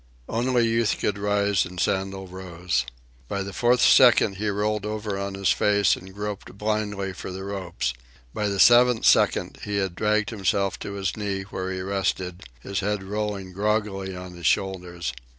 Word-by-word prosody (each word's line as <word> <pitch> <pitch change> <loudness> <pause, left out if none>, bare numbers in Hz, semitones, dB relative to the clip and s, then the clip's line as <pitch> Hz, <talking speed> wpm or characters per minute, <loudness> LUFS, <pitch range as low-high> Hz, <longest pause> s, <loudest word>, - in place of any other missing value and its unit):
Only 120 +1 +1
Youth 115 -1 +1
could 100 -1 -1
rise, 100 -1 +2
and 90 +1 -8
Sandel 95 +1 -1
rose. 90 -6 -3 0.4
At 100 -1 -2
the 100 - -7
fourth 120 +3 +3
second 120 -6 +6
he 105 +2 -2
rolled 105 +1 -1
over 105 -1 -3
on 100 0 -4
his 95 -1 +2
face 100 -1 +3
and 95 +1 -11
groped 105 -1 -6
blindly 105 -2 -2
for 95 - -7
the 95 +1 -6
ropes. 90 -11 -3 0.4
By 105 - -1
the 100 -1 -2
seventh 120 0 +6
second - - +3
he 105 - -3
had 95 -3 -1
dragged 105 +3 +1
himself 100 -2 0
to 100 - -6
his 95 -3 -2
knee, 100 -2 -3
where 95 -1 -5
he 95 0 -3
rested, 95 -2 -2 0.2
his 100 +7 -3
head 100 0 -1
rolling 100 -2 -4
groggily 100 -1 -1
on 90 0 -8
his 85 -2 -2
shoulders. 90 -7 -1
100 Hz, 170 wpm, -25 LUFS, 95-105 Hz, 0.4 s, second